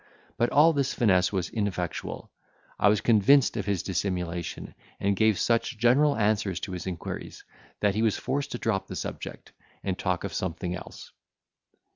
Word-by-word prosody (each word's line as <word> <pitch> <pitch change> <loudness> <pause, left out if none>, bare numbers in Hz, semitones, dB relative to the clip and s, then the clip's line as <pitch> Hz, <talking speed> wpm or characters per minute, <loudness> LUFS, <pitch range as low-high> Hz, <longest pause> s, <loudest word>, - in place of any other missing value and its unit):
But 120 - +1
all 160 +3 +5
his 140 -3 0
finesse 95 -7 +3
was 95 -4 -2
ineffectual, 95 -6 -3 0.5
I 105 - +5
was 105 0 +2
convinced 120 +5 +4
of 105 -3 -3
his 100 -4 0
dissimulation, 90 -2 -3 0.3
and 100 0 +1
gave 110 0 +3
such 115 +1 +1
general 135 +6 +4
answers 105 -4 +1
to 95 - -5
his 90 0 -5
inquiries, 90 -3 -6 0.4
that 105 -1 +3
he 110 - 0
was 110 -2 +2
forced 140 +1 -2
to - - -2
drop 110 -5 -1
the - - -7
subject, - - -6 0.3
and 95 -2 -1
talk 90 -3 -1
of 100 - -4
something 90 0 -3
else. 90 - -10
100 Hz, 165 wpm, -27 LUFS, 90-115 Hz, 0.5 s, all